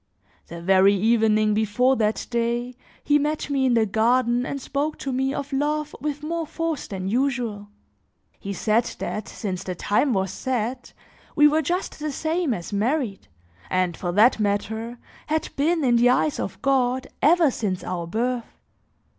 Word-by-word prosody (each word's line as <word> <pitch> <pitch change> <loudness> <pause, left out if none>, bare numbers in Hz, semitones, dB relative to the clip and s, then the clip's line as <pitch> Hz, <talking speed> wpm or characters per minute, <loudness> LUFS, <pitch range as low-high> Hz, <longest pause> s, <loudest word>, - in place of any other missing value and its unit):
The 170 0 -9
very 195 +2 +5
evening 215 0 +3
before 220 +5 +2
that 215 -1 0
day, 235 +1 -1 0.3
he 295 0 +3
met 295 0 -2
me 270 -2 +2
in 245 - +3
the 225 -1 +3
garden 240 +4 +2
and 280 - -4
spoke 285 +3 -2
to 275 - -4
me 265 +1 0
of 280 0 -5
love 300 +2 -1
with 295 0 -3
more 330 +1 -3
force 325 -2 -3
than 190 -2 -5
usual; 240 -3 -1 0.7
he 200 - -5
said 220 +4 +1
that, 215 - -4
since 185 -4 -5
the 185 - -4
time 210 - +1
was 190 -2 0
set, 250 +1 -3 0.4
we 295 0 +7
were 310 +2 +2
just 350 +4 -3
the 300 0 -3
same 315 +2 -1
as 180 -2 -4
married, 225 0 -1 0.4
and 185 -2 0
for 175 0 -3
that 220 +5 +5
matter 220 +3 -2 0.3
had 315 +1 -1
been 320 +3 +1
in 240 -2 +4
the 240 +1 +5
eyes 275 +4 +1
of - - -4
God, 260 -1 +1 0.2
ever 325 -1 +5
since 195 -6 -3
our 175 -2 -4
birth. 235 +5 -2
245 Hz, 165 wpm, -24 LUFS, 210-285 Hz, 0.7 s, we